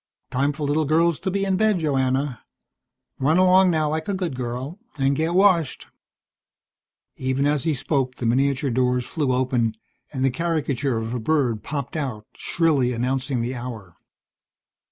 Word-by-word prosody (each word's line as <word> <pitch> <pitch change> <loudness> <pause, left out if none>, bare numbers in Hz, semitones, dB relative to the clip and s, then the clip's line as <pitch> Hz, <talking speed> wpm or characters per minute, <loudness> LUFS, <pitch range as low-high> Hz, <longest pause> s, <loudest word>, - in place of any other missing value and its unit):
"Time 140 +3 +1
for 145 +1 -4
little 150 +2 +1
girls 165 +2 +2
to 190 - -2
be 195 +1 0
in 190 -1 +1
bed, 215 -1 +3
Joanna. 135 -4 0 0.8
Run 150 +5 +3
along 185 0 +5
now 155 -3 +1
like 155 +5 -2
a 200 - 0
good 180 -7 -3
girl, 125 - -5 0.2
and 135 0 +2
get 160 +4 0
washed." 185 -7 +3 1.3
Even 130 +2 0
as 145 -2 +1
he 160 -3 +1
spoke 130 -1 -1
the 120 - -5
miniature 135 +3 +1
doors 125 0 +1
flew 145 -3 -1
open 125 -3 +1 0.4
and 135 -2 -1
the 135 - +3
caricature 145 -5 -1
of 115 +1 -3
a 125 - -2
bird 120 -4 +1
popped 140 -1 -5
out, 130 -9 -3
shrilly 145 -7 +1
announcing 130 +1 -1
the 125 +2 -2
hour. 115 -8 -7
140 Hz, 160 wpm, -23 LUFS, 125-160 Hz, 1.3 s, along